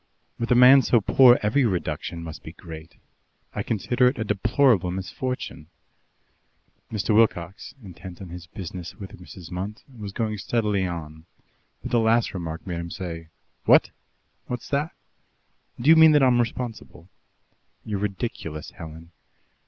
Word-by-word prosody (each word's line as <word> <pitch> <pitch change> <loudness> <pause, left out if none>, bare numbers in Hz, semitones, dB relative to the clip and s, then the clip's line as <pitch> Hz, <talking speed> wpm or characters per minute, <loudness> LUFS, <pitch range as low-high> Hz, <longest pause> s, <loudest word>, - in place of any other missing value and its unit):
"With 115 - -2
a - - +6
man 130 +2 +8
so 120 - +3
poor, 125 +4 +6
every 115 +7 +2
reduction 85 -5 -2
must 80 -2 -8
be - - -10
great. 80 0 -11 0.6
I - - -2
consider 120 +4 +1
it 125 - 0
a 110 - -1
deplorable 105 - +2
misfortune." 95 -2 -5 1.2
Mr. 110 0 0
Wilcox, 105 +1 +1
intent 90 -1 -10
on 95 - -9
his 85 -1 -9
business 90 -1 -8
with 95 -3 -10
Mrs. 90 -1 -11
Munt, 100 +6 -5
was 105 -3 -7
going 110 0 -2
steadily 105 -4 0
on, 80 -1 -7 0.6
but - - -5
the 120 - +3
last 115 +1 +2
remark 85 -3 -5
made 85 -2 -4
him 85 0 -5
say: 85 -2 -6 0.4
"What? - - +5 0.6
What's 125 -2 -5
that? 145 +3 -1 0.9
Do 120 - -3
you - - +9
mean 160 -1 +8
that 145 -2 +5
I'm 125 -2 +4
responsible?" 115 -7 -6 0.8
"You're 105 -3 -3
ridiculous, 95 -7 -4
Helen." 80 +1 -11
100 Hz, 145 wpm, -24 LUFS, 85-120 Hz, 1.2 s, you